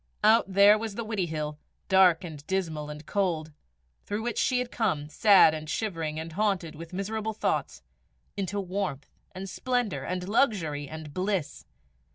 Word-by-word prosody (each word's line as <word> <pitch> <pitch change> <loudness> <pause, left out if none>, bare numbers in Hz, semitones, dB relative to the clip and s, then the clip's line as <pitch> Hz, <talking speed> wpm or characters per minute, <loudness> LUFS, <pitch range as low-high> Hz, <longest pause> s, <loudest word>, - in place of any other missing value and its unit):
Out 215 -2 +5
there 200 +2 +6
was 220 -2 -5
the 235 - -4
Widdiehill, 160 -8 -3 0.3
dark 190 -2 +5
and 155 -4 -8
dismal 160 -6 -2
and 150 0 -8
cold, 165 -6 -1 0.5
through 210 +2 -3
which 240 -1 -2
she 255 - +2
had 250 -1 -2
come, 155 -10 -1
sad 195 -2 +6
and 155 -1 -6
shivering 165 -6 -2
and 165 +1 -6
haunted 190 -3 0
with 165 +1 -10
miserable 215 +3 -3
thoughts, 215 - -2 0.5
into 200 0 -2
warmth 185 -7 -3 0.2
and 190 +1 -6
splendour 245 +1 -1
and 180 0 -3
luxury 170 - +1
and 155 -2 -8
bliss! 185 -3 -2
185 Hz, 155 wpm, -28 LUFS, 155-210 Hz, 0.5 s, there